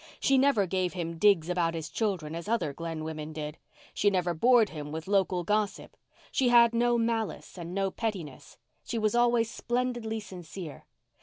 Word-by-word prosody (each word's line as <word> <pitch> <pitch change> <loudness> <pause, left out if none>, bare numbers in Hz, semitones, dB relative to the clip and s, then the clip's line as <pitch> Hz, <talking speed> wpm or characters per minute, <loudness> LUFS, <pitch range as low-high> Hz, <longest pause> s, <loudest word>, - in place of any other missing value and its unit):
She 275 - +3
never 265 -7 +3
gave 185 -1 -1
him 170 -2 -4
digs 195 -5 +4
about 175 -2 0
his 160 -1 -4
children 185 -9 -2
as 170 +3 -6
other 215 -10 0
Glen 165 +1 -5
women 155 -1 -5
did; 150 0 -6 0.3
she 205 - +3
never 180 -3 0
bored 235 +5 +4
him 150 -2 -7
with 160 +2 -6
local 190 -3 +1
gossip; 210 +2 -1 0.4
she 260 -2 +2
had 235 -1 +6
no 240 +1 +3
malice 230 -2 -2
and 175 0 -7
no 195 -1 0
pettiness. 185 - -5 0.3
She 235 - -4
was 215 -1 +1
always 240 -1 +3
splendidly 240 -2 -2
sincere. 180 -5 -9
195 Hz, 170 wpm, -29 LUFS, 165-230 Hz, 0.4 s, had